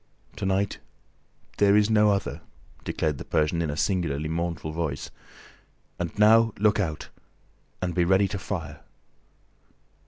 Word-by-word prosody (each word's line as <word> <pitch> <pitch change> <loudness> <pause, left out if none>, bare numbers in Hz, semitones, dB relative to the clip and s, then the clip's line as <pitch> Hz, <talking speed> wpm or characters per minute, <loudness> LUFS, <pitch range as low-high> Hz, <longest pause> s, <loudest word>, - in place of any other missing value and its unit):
"To 100 -2 -2
night, 95 +1 0 0.8
there 100 0 +5
is 105 -1 +4
no 105 -1 +5
other!" 100 0 -1 0.4
declared 75 -4 -2
the - - -5
Persian, 80 +2 0
in 80 - -1
a 75 - -4
singularly 80 -6 -1
mournful 85 -1 -3
voice. 80 -4 -4 0.9
"And 85 +1 -4
now, 110 +1 +5
look 105 0 +2
out! 80 -7 -3 0.7
And 90 -1 -1
be 90 - +2
ready 95 +3 +3
to 100 - -4
fire." 80 -6 -5
90 Hz, 135 wpm, -26 LUFS, 80-100 Hz, 0.9 s, there